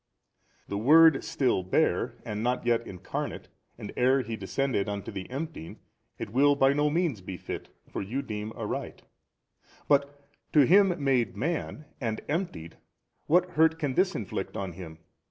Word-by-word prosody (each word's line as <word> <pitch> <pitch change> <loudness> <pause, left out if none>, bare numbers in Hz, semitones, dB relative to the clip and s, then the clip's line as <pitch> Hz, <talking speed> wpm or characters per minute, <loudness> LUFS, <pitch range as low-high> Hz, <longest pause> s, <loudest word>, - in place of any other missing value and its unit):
A. - - -27
The 100 - -1
Word 155 +4 +6
still 125 -8 +1
bare 90 - +1
and 105 0 -4
not 125 +1 -1
yet 115 -1 +1
Incarnate 90 -2 -5 0.3
and - - -8
ere 130 +2 +3
He 115 0 -4
descended 110 +1 -1
unto 100 0 -4
the 95 -2 -7
emptying, 135 - -6 0.4
it - - -6
will 140 +4 +4
by 135 0 +4
no 145 +1 +2
means 155 - 0
befit 90 -1 -7 0.2
(for - - -5
you 120 +8 -3
deem 105 -1 -5
aright), - - -5 0.8
but 145 0 +1 0.3
to 150 - +7
Him 180 -1 +4
made 130 -4 +1
man 155 0 -3 0.2
and 110 -3 -2
emptied 145 - -3 0.5
what 180 +3 +3
hurt 160 +1 +3
can 145 -5 -2
this 185 +6 +2
inflict 100 0 -4
on 95 -3 -3
Him? 80 -3 -9
130 Hz, 155 wpm, -28 LUFS, 105-150 Hz, 0.8 s, to